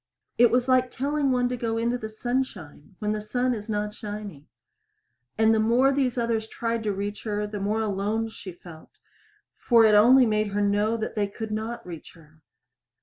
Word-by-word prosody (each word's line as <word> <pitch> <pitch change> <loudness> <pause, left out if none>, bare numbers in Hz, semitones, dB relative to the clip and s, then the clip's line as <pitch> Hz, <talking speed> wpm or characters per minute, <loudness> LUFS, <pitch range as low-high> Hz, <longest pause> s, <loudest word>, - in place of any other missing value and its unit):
It 240 -1 +7
was 245 +1 +1
like 255 -1 +3
telling 280 +2 -1
one 250 -1 +2
to 250 - -2
go 230 -2 -2
into 235 +2 0
the 220 -3 -5
sunshine 215 - -4
when 210 -1 -2
the 215 0 -2
sun 245 +4 -1
is 215 -1 -7
not 210 0 -2
shining. 205 -9 -8 0.9
And 220 0 +4
the 220 - +2
more 240 +5 +3
these 265 -3 0
others 230 -2 -1
tried 230 0 -3
to 210 - +1
reach 200 +1 -4
her, 210 -1 -1
the 205 0 -6
more 210 +3 -1
alone 215 +2 -1
she 195 -3 -9
felt, 170 -2 -14 0.6
for 230 -2 +4
it 215 - +5
only 245 +5 +7
made 215 -1 +1
her 205 - 0
know 205 +2 +1
they 215 -2 -2
could 220 +2 -7
not 220 +2 -4
reach 170 -3 -10
her. 155 -1 -21
220 Hz, 190 wpm, -25 LUFS, 205-240 Hz, 0.9 s, It